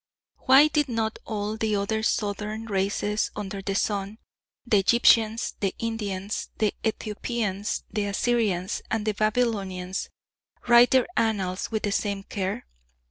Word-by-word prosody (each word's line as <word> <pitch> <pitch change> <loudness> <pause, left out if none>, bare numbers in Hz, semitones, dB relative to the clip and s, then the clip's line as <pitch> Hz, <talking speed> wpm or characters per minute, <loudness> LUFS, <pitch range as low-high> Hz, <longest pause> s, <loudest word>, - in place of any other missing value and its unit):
Why 270 +3 +8
did 295 -2 0
not 225 -2 -2
all 210 0 -3
the 220 -1 0
other 205 +2 -1
Southern 210 0 -2
races 205 +1 0
under 200 -1 -5
the 195 0 -3
sun 200 0 -1 0.5
the 215 -4 +4
Egyptians, 225 +1 +4
the 195 -2 -1
Indians, 205 -3 -3
the 215 -2 +1
Ethiopians, 215 -2 -2
the 210 -2 -1
Assyrians 200 -3 0
and 220 -1 -1
the 215 - +1
Babylonians 205 -4 -1 0.6
write 240 0 +7
their 260 -1 +4
annals 195 -5 0
with 220 -1 -2
the 205 - 0
same 200 -1 -1
care? 195 -1 -4
210 Hz, 135 wpm, -26 LUFS, 200-225 Hz, 0.6 s, Why